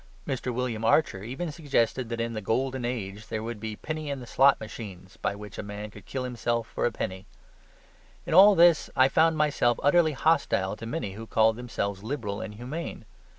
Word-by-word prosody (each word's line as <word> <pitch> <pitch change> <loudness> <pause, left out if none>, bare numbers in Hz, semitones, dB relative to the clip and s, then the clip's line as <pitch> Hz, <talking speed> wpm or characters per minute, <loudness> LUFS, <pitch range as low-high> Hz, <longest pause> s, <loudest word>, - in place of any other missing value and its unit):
Mr. 130 -3 -2
William 120 -2 -2
Archer 115 -5 +3
even 135 +9 -4
suggested 130 -6 0
that 115 -1 -3
in 115 0 -2
the 110 - -4
golden 130 +5 -1
age 110 -3 -4
there 110 0 -3
would 115 -1 -5
be 110 0 -5
penny 155 +4 -5
in 140 -1 -3
the 125 - -8
slot 135 +4 +4
machines, 100 -4 -9
by - - -2
which 105 -1 -9
a - - -1
man 105 0 -7
could 100 -3 -14
kill 130 -1 -3
himself 120 -2 -1
for - - -1
a - - -2
penny. 95 -3 -5 1.0
In 170 - -3
all 200 +4 +9
this 170 -2 +5
I 130 - +6
found 160 +3 +3
myself 140 -6 +2
utterly 155 +2 +4
hostile 135 -10 +1
to 115 - -7
many 115 -6 -3
who 110 +3 -8
called 110 0 +3
themselves 100 -5 -3
liberal 110 -4 -4
and 105 +2 -6
humane. 125 +3 -6
120 Hz, 195 wpm, -27 LUFS, 105-140 Hz, 1.0 s, all